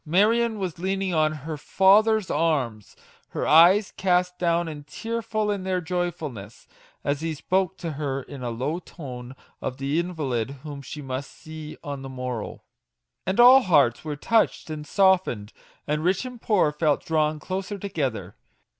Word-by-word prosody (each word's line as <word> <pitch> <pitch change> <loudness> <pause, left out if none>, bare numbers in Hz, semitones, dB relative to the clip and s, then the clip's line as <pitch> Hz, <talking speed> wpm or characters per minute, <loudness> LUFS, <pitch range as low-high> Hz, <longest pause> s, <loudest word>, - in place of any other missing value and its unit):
Marion 220 +7 +2
was 185 -4 -4
leaning 190 0 -1
on 155 -1 +3
her 155 +1 -6
father's 205 +5 +4
arm 140 -9 +1
her 105 - -11
54 - - 0
MAGIC - - 0
WORDS. - - -1
eyes 185 +6 +6
cast 180 -1 +1
down 170 -1 +1
and 150 -2 -8
tearful 225 +2 -2
in 200 -2 -2
their 185 -1 0
joyfulness, 160 - -4 0.4
as 145 +1 -1
he 165 -1 -2
spoke 190 +4 0
to 170 -3 -4
her 140 -2 -3
in 140 -1 -10
a 120 - -3
low 130 +9 -2
tone 130 -8 -9 0.3
of 130 - -4
the 140 +4 0
invalid 145 -10 -2
whom 145 -2 -7
she 150 +2 -8
must 130 +1 -4
see 155 -1 -9
on 140 -2 -5
the 135 - -7
morrow. 125 -4 -5 0.6
And 190 +4 0
all 255 +2 +9
hearts 145 - +3
were 150 -1 -4
touched 215 0 +1
and 150 -1 -6
softened, 185 - +2 0.3
and 150 +1 -1
rich 185 +7 +1
and 250 -2 -8
poor 195 -8 +3
felt 150 -1 0
drawn 155 -1 +1
closer 190 +5 -4
together! 135 - -3
160 Hz, 170 wpm, -25 LUFS, 140-190 Hz, 0.6 s, all